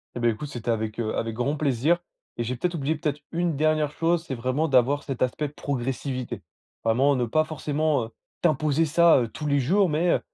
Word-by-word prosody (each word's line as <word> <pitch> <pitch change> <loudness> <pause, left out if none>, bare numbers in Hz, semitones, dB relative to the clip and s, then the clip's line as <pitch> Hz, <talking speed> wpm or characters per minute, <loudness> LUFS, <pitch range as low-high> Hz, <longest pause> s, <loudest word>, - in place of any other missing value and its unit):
Et - - -3
beh, 120 - +4
écoute, 115 +7 -3
c'était 120 -4 -3
avec, 110 -1 -2
heu, 110 -2 -1
avec 115 -1 -2
grand 135 +6 -1
plaisir 145 +3 +2 0.4
et 120 - -1
j'ai 125 +2 -2
peut-être 175 +8 -2
oublié 155 0 0
peut-être 150 -1 -2
une 170 -1 0
dernière 155 -1 +2
chose. 165 +2 +1
C'est 140 - -4
vraiment 130 +6 0
d'avoir 135 +2 +3
cet 135 -3 -5
aspect 140 +4 0
progressivité. 135 -2 -3 0.4
Vraiment, 130 +5 +3
ne 125 - +1
pas 155 +7 +2
forcément 155 -3 -1
heu - - -11 0.3
t'imposer 155 -1 +2
ça 165 -3 +5
tous 150 - -6
les 140 -1 +2
jours. 185 +9 +3
Mais, 165 +3 +2
heu, - - +3
145 Hz, 205 wpm, -25 LUFS, 125-155 Hz, 0.4 s, ça